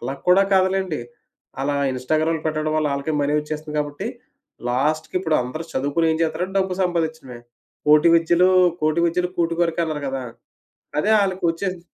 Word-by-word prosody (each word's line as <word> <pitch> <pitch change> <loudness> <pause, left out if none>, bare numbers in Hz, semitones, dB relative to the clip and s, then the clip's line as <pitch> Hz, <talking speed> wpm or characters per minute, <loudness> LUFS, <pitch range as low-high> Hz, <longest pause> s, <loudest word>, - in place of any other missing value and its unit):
అలా 135 - -4
కూడా 190 +2 +6
కాదులెండి. 190 -5 +1 0.6
అలా 145 +1 0 0.2
ఇన్‌స్టాగ్రాములు 155 +5 -1
పెట్టడం 155 0 -1
వల్ల 155 -1 +1
ఆళ్ళకే 140 +3 -3
మనీ 145 +1 0
ఒచ్చేస్తది 150 0 -6
కాబట్టి, 145 -1 -3 0.6
లాస్ట్‌కి 150 +7 -1
ఇప్పుడు 160 -4 +1
అందరూ 155 +7 -6
చదువుకొని 145 +5 0
ఏం - - -1
జేస్తారంటే 180 +4 -2
డబ్బు 190 -1 0
సంపాదించటమే. 160 -8 -2 0.5
కోటి 150 +3 +6
విద్యలు 170 +2 +4 0.3
కోటి 155 +2 +1
విద్యలు 180 +1 0
కూటి 170 0 +1
కురకే 170 0 +1
అన్నారు 155 -2 -4
గదా! 135 -1 -3 0.8
అదే 210 +8 +1
ఆళ్ళకి 190 -1 -1
ఒచ్చేసి 180 +1 -4
160 Hz, 150 wpm, -22 LUFS, 150-175 Hz, 0.8 s, కూడా